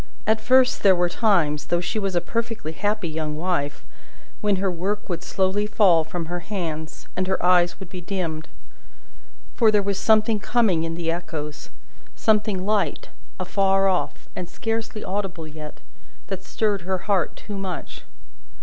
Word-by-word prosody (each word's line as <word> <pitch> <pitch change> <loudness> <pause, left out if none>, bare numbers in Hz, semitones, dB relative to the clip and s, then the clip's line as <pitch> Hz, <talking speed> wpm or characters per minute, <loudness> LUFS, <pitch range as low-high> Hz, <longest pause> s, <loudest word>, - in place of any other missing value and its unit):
At 220 +1 +2
first, 260 +2 +4
there 195 -2 +6
were 175 0 +2
times, 170 -8 +2
though 175 - +2
she 180 +5 -2
was 195 -3 -1
a 175 - +3
perfectly 230 -4 -3
happy 205 +3 -1
young 155 -1 -3
wife, 160 -4 -2 0.6
when 210 -1 +3
her 190 0 0
work 195 +4 -2
would 175 -2 -3
slowly 190 +3 0
fall 185 -7 +5
from 165 +1 -4
her 175 +2 -3
hands, 165 -5 -5
and 185 0 0
her 190 - +1
eyes 180 -1 +4
would 190 -3 -9
be 180 - -6
dimmed. 170 -4 -3 1.0
For, 225 -3 +4
there 210 -1 +3
was 200 -1 -1
something 220 0 +4
coming 205 -6 +2
in 165 0 -2
the 165 -1 -1
echoes, 150 -4 -5 0.5
something 210 -4 +2
light, 210 -1 0 0.3
afar 195 +1 +2
off, 185 -2 -1
and 180 -1 -5
scarcely 225 -1 -3
audible 185 -4 -3
yet, 155 -1 -9 0.5
that 190 -1 -4
stirred 205 -2 0
her 185 +1 -3
heart 195 -4 +1
too 205 - -8
much. 190 -2 -5
185 Hz, 160 wpm, -24 LUFS, 170-210 Hz, 1.0 s, there